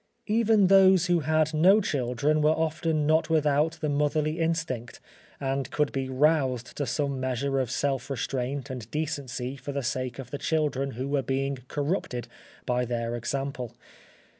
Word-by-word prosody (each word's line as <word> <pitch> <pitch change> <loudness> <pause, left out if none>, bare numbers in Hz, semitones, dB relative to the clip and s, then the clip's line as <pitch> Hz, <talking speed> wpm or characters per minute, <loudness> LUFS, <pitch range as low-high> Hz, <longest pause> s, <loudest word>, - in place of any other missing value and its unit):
Even 220 -2 +3
those 190 -1 +6
who 175 -2 +3
had 155 +1 +1
no 185 +7 +6
children 140 - 0
were 150 - +4
often 160 -1 0
not 160 +2 +2
without 155 0 +2
the 155 - 0
motherly 150 +2 0
instinct, 165 -8 -2 0.4
and 135 0 -2
could 150 -1 0
be 135 -1 -3
roused 130 -3 +1
to 145 - -1
some 140 +1 -1
measure 130 +1 -1
of 130 -3 -1
self 135 0 -1
restraint 135 +1 -3
and 120 -4 -7
decency 140 -4 -3
for 140 +2 -7
the 140 -1 -2
sake 125 0 -2
of 130 -2 -8
the 145 - -4
children 140 -4 0
who 130 +4 -4
were 140 0 +1
being 135 +1 -2
corrupted 140 -5 -2 0.4
by 125 0 +1
their 120 -1 -2
example. 125 0 -4
140 Hz, 160 wpm, -27 LUFS, 130-155 Hz, 0.4 s, those